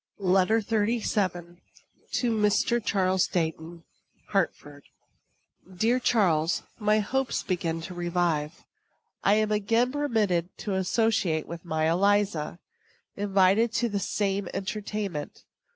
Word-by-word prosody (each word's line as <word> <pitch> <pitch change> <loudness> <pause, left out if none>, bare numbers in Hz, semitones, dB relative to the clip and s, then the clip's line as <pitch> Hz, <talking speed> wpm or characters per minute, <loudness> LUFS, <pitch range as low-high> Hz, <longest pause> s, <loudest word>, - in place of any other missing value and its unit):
LETTER 195 +3 +3
XXXVII. 205 -5 -1 0.5
TO 245 -2 0
MR. 220 +2 +2
CHARLES 185 -2 +1
DEIGHTON. 165 0 -3 0.5
HARTFORD. 145 -7 -2 0.9
Dear 235 +6 +2
Charles: 180 -10 +2 0.2
My 210 0 +3
hopes 260 +5 -1
begin 165 -3 -2
to 180 +3 -7
revive. 175 -3 -1 0.6
I 200 - +4
am 215 0 +1
again 225 +4 +2
permitted 215 - 0
to 205 - -4
associate 190 -4 +1
with 170 -1 -8
my 160 -2 0
Eliza 190 -2 +1 0.6
invited 200 +3 +3
to 235 +1 +1
the 205 -1 -1
same 195 -1 -1
entertainment. 200 -5 -4
195 Hz, 105 wpm, -27 LUFS, 175-215 Hz, 0.9 s, I